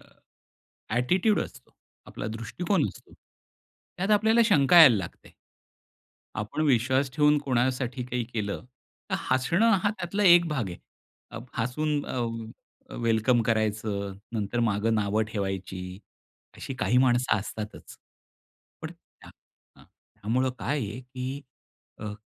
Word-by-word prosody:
अ, - - -20 0.9
attitude 185 - +2
असतो, 125 - -10 0.4
आपला 110 - -6
दृष्टिकोन 125 - -1
असतो. - - -13 0.8
त्यात 195 +4 -1
आपल्याला 220 +3 +4
शंका 170 -3 +6
यायला 135 -8 +9
लागते. 90 -4 -8 1.0
आपण 105 +9 -3
विश्वास 130 +1 +2
ठेवून 150 0 +4
कोणासाठी 125 -1 -1
काही 125 -1 -3
केलं 110 -3 -4 0.5
तर - - +1 0.2
हसणं 170 - +3
हा 205 - +2
त्यातला 200 0 -3
एक 175 -1 +7
भाग 130 -10 -2
आहे. 85 - -8 0.8
हसून 145 +5 -1
अ, 115 -3 -6
वेलकम 115 +1 +2
करायचं, 110 -3 -1 0.2
नंतर 110 +1 -2
मागं 110 0 +1
नावं 105 0 +1
ठेवायची 95 -3 -4 0.6
अशी 135 - -6
काही 115 +1 +1
माणसं 125 -3 +3
असतातच. 105 +1 -8 0.9
पण 160 - -5
त्या 170 - -20
हां, - - -15 0.4
हां, - - -18 0.4
त्यामुळे 125 +5 +1
काय 145 +3 -1
आहे, 110 +2 -5
की 130 +2 -6 0.6
अ, 105 -1 -5
125 Hz, 120 wpm, -27 LUFS, 110-145 Hz, 1.0 s, यायला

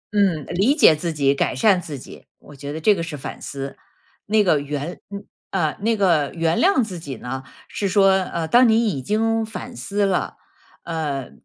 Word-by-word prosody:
嗯， 180 -8 +2
呃， - - -6
理 210 +11 +3
解 225 - +6
自 165 +2 -3
己、 140 -3 +2
改 140 - -1
善 185 +6 +3
自 155 -4 -7
己， 125 - -13
我 145 - -15
觉 140 +1 -7
得 155 - -5
这 205 +6 +4
个 175 - -3
是 165 -3 -5
反 135 - -8
思。 135 -1 -6 0.5
那 215 0 +3
个 160 -6 +3
原 145 +4 -5
嗯， 200 0 -8 0.2
呃， 160 -6 -1
那 225 +1 +1
个 170 -8 +2
原 165 0 +1
谅 360 -10 +4
自 185 -5 -6
己 140 -5 -7
呢， 130 +3 -6 0.2
是 200 - -3
说 195 0 +5
呃， 180 -4 -1
当 240 +6 +5
你 225 +1 +3
已 140 -9 -3
经 225 - 0
反 240 +3 -7
思 205 -2 -1
了， 190 -2 -1 0.5
呃， 150 -6 -4
175 Hz, 215 characters per minute, -22 LUFS, 145-205 Hz, 0.5 s, 解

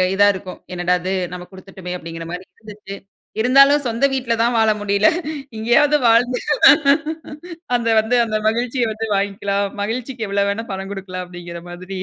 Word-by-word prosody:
இதா 205 +1 +5
இருக்கும். 185 -1 -8
என்னடா 180 0 +1
இது 185 +2 -2 0.2
நம்ம 180 0 -7
குடுத்துட்டமே! 190 -1 -9
அப்படிங்கிற 165 -1 -8
மாதிரி 180 +1 -6 0.2
இருந்துச்சு. 210 -2 -10 0.5
இருந்தாலும் 275 +4 +5
சொந்த 235 +4 +1
வீட்டில 255 -3 0
தான் 235 0 +1
வாழ 220 0 +4
முடியல. 200 0 +2 0.5
இங்கேயாவது 240 +7 +3
வாழ்ந்து 245 +2 +3 1.4
அந்த 235 -1 -1
வந்து 220 +3 0
அந்த 215 -1 -1
மகிழ்ச்சிய 240 +1 -1
வந்து 220 +1 -4
வாங்கிக்கலாம். 200 0 -1 0.2
மகிழ்ச்சிக்கு 235 +1 -4
எவ்வளவு 200 0 +1
வேணா 225 +3 -4
பணம் 195 +1 -6
குடுக்கலாம், 185 -2 -6
அப்படிங்கிற 175 -1 -9
மாதிரி. 185 +2 -7
205 Hz, 150 wpm, -19 LUFS, 185-235 Hz, 1.4 s, இதா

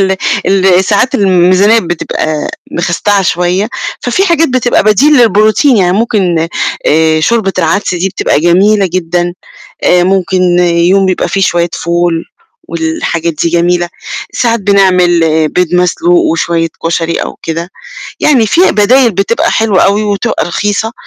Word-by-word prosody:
ال 190 0 +1 0.3
ال 190 -1 +2
ساعات 255 +7 0
الميزانية 190 +2 +3
بتبقى 155 -3 -3 0.2
مخستعة 195 +4 0
شوية، 180 +3 -1 0.3
ففي 375 +11 0
حاجات 330 -3 +2
بتبقى 250 -4 0
بديل 240 +3 +4
للprotien 215 +6 +1
يعني 180 -1 +2
ممكن 185 -7 0 0.4
آآ 160 0 +2
شوربة 215 +1 0
العدس 180 +2 0
دي 180 +2 -1
بتبقى 145 -5 -1
جميلة 195 +4 +2
جدًا، 175 0 -2 0.5
آآ 180 0 +3
ممكن 185 -1 +1
يوم 175 +3 +2
بيبقى 185 -1 -1
في 195 - -1
شوية 175 -1 0
فول، 170 -1 -1 0.5
والحاجات 165 0 -3
دي 165 +2 -1
جميلة. 175 +1 0 0.4
ساعات 230 -2 0
بنعمل 185 -3 +2 0.3
بيض 180 -1 -1
مسلوق 335 - +1
وشوية 170 - -1 0.2
كشري 165 0 -1
أو - - -4
كده، 165 +2 -4 0.5
يعني 260 -7 +2
في 325 - +1
بدايل 235 +4 +3
بتبقى 195 +5 -1
حلوة 215 -5 +1
أوي 205 +2 +1
وتبقى 205 -2 -2
رخيصة، 205 +5 -2
185 Hz, 135 wpm, -10 LUFS, 175-210 Hz, 0.5 s, بديل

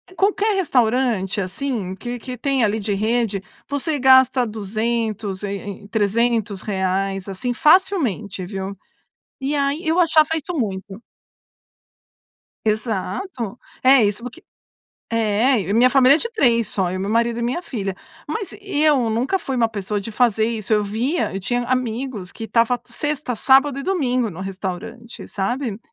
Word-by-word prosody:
Qualquer 410 +2 +2
restaurante 240 - +1
assim, 195 0 -3
que 240 +5 -5
que 250 +1 -7
tem 270 0 +1
ali 215 +1 +1
de 205 0 -1
rede, 215 -1 0 0.2
você 285 +1 -1
gasta 260 -1 +5
200 215 -1 -2
e 200 - -2
e 200 0 -8
e 200 - -12
300 220 -1 0
reais, 195 -1 -1
assim 195 +6 -3
facilmente, 260 - +2
viu, 195 +1 -5 0.7
e 275 +2 -1
aí 285 +3 -1
eu 325 +3 +3
achava 315 -2 +4
isso 320 +3 -4
muito. 195 -3 -4 1.7
Exato, 220 - -2 0.3
é 260 -2 +7
isso, 210 +3 0
porque 255 +8 -9 0.7
é, 225 +2 +2
e 185 - -6
a 205 - +1
minha 245 +2 +6
família 270 +1 +6
é - - -3
de 465 - -2
3, 235 - +2
só 185 -3 0
eu, 185 +1 -3
meu 195 - -2
marido 235 +1 +1
e - - -2
minha 255 +9 -1
filha, 200 - -4 0.3
mas 390 +6 -3
eu 300 - +2
nunca 245 - 0
fui 270 -7 -3
uma 230 -2 +3
pessoa 205 -1 -3
de 215 +3 -6
fazer 225 -2 +2
isso. 220 -3 -3
Eu 210 -1 +3
via, 240 - -1
eu 195 - -4
tinha 245 +5 -1
amigos 245 -5 -2
que 225 - -7
estava 230 +2 +2
sexta, 295 -4 -3
sábado 270 +4 +4
e - - -4
domingo 255 - 0
no 175 0 -9
restaurante, 195 +5 -6
sabe? 220 +2 -2
235 Hz, 155 wpm, -21 LUFS, 205-265 Hz, 1.7 s, é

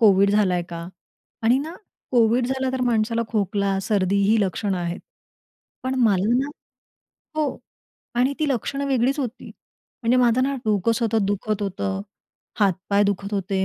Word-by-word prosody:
COVID 200 -2 +5
झालाय 185 -4 +2
का? 170 0 -6 0.5
आणि 240 +4 +4
ना 315 +5 -5 0.4
कोव्हिड 240 +1 +4
झालं 265 0 -1
तर 260 - -2
माणसाला 230 -1 +1
खोकला, 200 -2 0
सर्दी 195 -1 +1
ही 215 +2 +3
लक्षणं 195 0 -1
आहेत. 170 +1 -3 0.8
पण 260 0 -1
मला 205 +2 +3
ना 275 +2 0 0.9
हो. 305 -2 -1 0.6
आणि 255 +3 +2
ती 305 -2 +1
लक्षणं 275 +2 -1
वेगळीच 265 +2 +1
होती. 255 -2 -4 0.5
म्हणजे 235 +2 +3
माझं 250 0 +4
ना, 275 +1 +1
डोकं 215 +1 +2
सतत 225 -1 +1
दुखत 205 +1 -1
होतं. 195 0 -2 0.6
हात-पाय 200 +1 +2
दुखत 200 +1 -2
होते. 190 0 0
215 Hz, 145 wpm, -23 LUFS, 195-250 Hz, 0.9 s, कोव्हिड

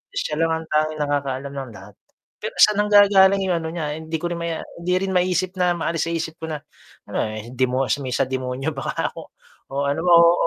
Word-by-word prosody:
siya 150 - -2
lang 165 +1 +1
ang 160 0 -3
tanging 155 0 0
nakakaalam 140 -2 -2
ng 135 -3 -5
lahat 100 0 -12 0.5
pero - - -5
saan 210 -1 +5
nanggagaling 200 -1 +6
yung 180 - +2
ano, 160 - -4
niya 155 -2 -3
hindi 160 0 -3
ko 175 +2 -3
rin 170 - -3
ma 170 - -2 0.2
hindi 170 +1 -5
rin 190 +1 -1
maisip 185 0 +1
na 180 -1 +3
maalis 165 -1 -1
sa - - -2
isip 165 -1 -3
ko 160 - -5
na 155 -2 -4 0.5
ano - - -6 0.4
demo 130 +1 +1 0.2
may 130 -2 -4
sa 135 - +2
demonyo 130 +2 -3
baka 135 -3 -2
ako - - -9 0.5
o 140 +1 -1
ano 145 +3 0
ba, 180 - +2
oo, 170 0 +8
160 Hz, 210 wpm, -22 LUFS, 140-175 Hz, 0.5 s, oo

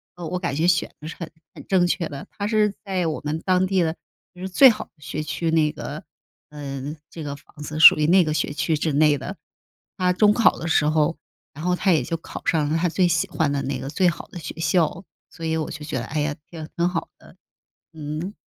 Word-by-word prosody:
呃， 175 - -7
我 180 +3 -2
感 170 -6 -2
觉 160 +3 +1
选 170 -1 +2
得 155 - -7
是 - - -7
很 170 -3 -5 0.2
很 - - -12
正 185 -2 +3
确 170 -1 -1
的， 140 -2 -8
它 205 - -1
是 210 -2 +2
在 190 -3 -1
我 155 - -2
们 155 +2 -1
当 185 0 +3
地 190 -1 +2
的 160 0 -1 0.4
就 180 - -13
是 190 - -3
最 265 +8 +8
好 220 - -2
的 - - -36
学 150 +1 -5
区， 155 +2 -2
那 155 -2 +3
个， 150 - -7 0.5
呃， 145 0 -6
这 165 - -8
个 145 -1 -4
房 145 - -20
子 155 +1 -5
属 160 - +11
于 150 - +2
那 180 +2 +6
个 155 -2 -1
学 150 -1 -1
区 160 +2 0
之 155 +1 -1
内 150 0 +4
的。 185 +9 -7 0.6
他 180 -2 +2
中 205 +3 +4
考 230 - +4
的 165 - -5
时 160 -2 +3
候， 155 +1 +2 0.4
然 155 - -9
后 180 0 +2
他 190 +1 +2
也 160 - +4
就 165 - -3
考 165 - -9
上 155 -4 +2
了 155 - 0
他 175 +1 +1
最 180 +2 +2
喜 165 -1 +1
欢 155 -3 0
的 140 -1 -1
那 135 - -3
个 135 - -5
最 180 +5 +3
好 170 - -6
的 175 - -7
学 155 - -7
校， 165 +1 +1 0.3
所 165 - -8
以 160 0 0
我 155 - -3
就 150 - -7
觉 155 - -3
得， 120 - -5
哎 150 +4 -3
呀， 145 0 -1
挺 160 -2 -8
挺 170 +1 +1
好 170 -2 -3
的， - - -17 0.6
嗯。 155 +5 -5
160 Hz, 265 characters per minute, -23 LUFS, 150-180 Hz, 0.6 s, 属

